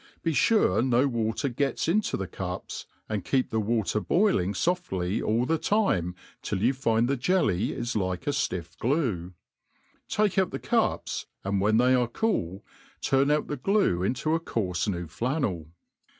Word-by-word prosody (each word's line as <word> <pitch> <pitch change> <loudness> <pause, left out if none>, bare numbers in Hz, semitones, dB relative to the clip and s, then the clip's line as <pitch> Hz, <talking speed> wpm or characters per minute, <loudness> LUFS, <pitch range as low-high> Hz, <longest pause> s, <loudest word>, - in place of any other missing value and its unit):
Be 165 - +1
fure 140 - +3
no 130 +1 +3
water 115 +1 -1
gets 135 +4 -1
into 200 +6 +1
the 95 - -3
cups, 90 +1 -6 0.2
and 105 -4 -2
keep 130 +4 0
the 110 - +1
water 110 -1 0
boiling 165 - +2
foftly 95 - -1
all 115 +3 +1
the 165 +3 +1
time 95 - +1 0.3
till - - -2
you 125 +4 +4
find 115 -3 +1
the 140 - +1
jelly 125 - +1
is 120 -1 -3
like 95 -3 -1
a 145 - +1
fiifFglue; 95 - -1 0.8
take 210 -2 +2
out 190 - +2
the - - -4
cups, - - -1 0.2
anJ 100 0 0
when 110 +2 +3
they 125 +2 +4
are 125 -2 +3
cool, 110 - -2 0.3
turn 135 +1 +2
out 150 0 +2
the 145 - -4
glue 195 - +2
inta 130 +9 0
a 165 - +2
coarfe 95 - -2
new 90 -4 -2
flannel. 100 - -2
120 Hz, 165 wpm, -27 LUFS, 95-145 Hz, 0.8 s, you